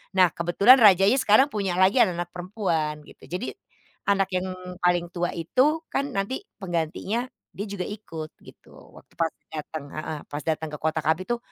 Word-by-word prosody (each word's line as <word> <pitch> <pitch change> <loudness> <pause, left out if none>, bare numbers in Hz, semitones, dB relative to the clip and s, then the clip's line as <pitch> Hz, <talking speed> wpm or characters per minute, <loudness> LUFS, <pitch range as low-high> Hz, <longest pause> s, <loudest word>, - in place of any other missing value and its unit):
Nah 185 -2 +6
kebetulan 195 +9 +5
rajanya 200 +3 +6
sekarang 260 +7 +5
punya 195 -4 -1
lagi 190 +5 +4
anak-anak 175 -4 +2
perempuan 170 -5 -2
gitu. - - -18
Jadi 185 +8 -4 0.6
anak 195 -1 +2
yang 185 +1 0 0.3
paling 175 -1 +2
tua 175 0 -1
itu 265 - +1
kan 280 +1 -1
nanti 195 +7 -1 0.2
penggantinya, 190 +6 -2 0.3
dia 205 - -5
juga 195 -2 -3
ikut 165 -7 -7
gitu - - -17 0.3
waktu - - -17
pas 165 - +3 0.2
datang 155 -1 -6
heeh, 155 0 -5
pas 145 - -3
datang 160 0 -2
ke - - -4
kota 160 0 0
kami 160 +3 +2
tuh 240 0 0
180 Hz, 165 wpm, -25 LUFS, 165-210 Hz, 0.6 s, Nah